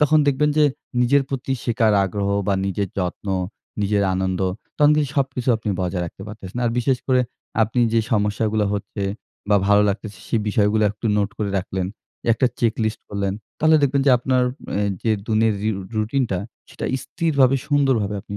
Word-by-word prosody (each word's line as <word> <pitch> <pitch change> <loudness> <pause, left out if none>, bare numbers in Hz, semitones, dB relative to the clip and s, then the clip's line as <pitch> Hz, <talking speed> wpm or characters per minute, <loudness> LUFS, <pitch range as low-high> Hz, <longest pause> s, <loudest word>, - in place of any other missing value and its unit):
তখন 155 +1 +5
দেখবেন 145 +2 +2
যে 150 - +6 0.4
নিজের 135 +3 +4
প্রতি 135 0 -3
শেখার 115 -2 +2
আগ্রহ 100 +1 -2 0.2
বা 100 - +2
নিজের 100 +1 -1
যত্ন, 90 +2 -3 0.5
নিজের 100 0 +1
আনন্দ 95 0 -1 0.4
তখন 150 0 +5
কিন্তু 145 -3 +1
সবকিছু 130 -2 -1
আপনি 110 - -5
বজায় 90 0 -1
রাখতে 95 - -10
পারতেছেন। 105 +1 -8
আর 115 - +2
বিশেষ 125 +1 +1
করে 130 -1 +3 0.4
আপনি 115 +3 0
যে 115 - +4
সমস্যাগুলা 105 0 +1
হচ্ছে 100 0 -5 0.5
বা 105 - +6
ভালো 105 0 +5
লাগতেছে 100 0 -4
সে - - +1
বিষয়গুলা 105 +1 +2
একটু 105 +2 -5
নোট 105 0 +1
করে 105 -2 -1
রাখলেন 95 0 -3 0.5
একটা 130 +3 +2
চেকলিস্ট 110 -1 0
করলেন। 100 -1 -2 0.3
তাহলে 155 0 +5
দেখবেন 140 0 +2
যে - - +7
আপনার 130 0 +1 0.4
এ - - +1 0.2
যে 115 - +1 0.2
দিনের 110 0 +2 0.2
ঋ - - +2 0.3
রুটিনটা 110 -2 0 0.3
সেটা - - -7 0.2
স্থিরভাবে 140 -5 +2
সুন্দরভাবে 130 -9 +2
আপনি 100 -1 -7
110 Hz, 165 wpm, -22 LUFS, 100-130 Hz, 0.5 s, যে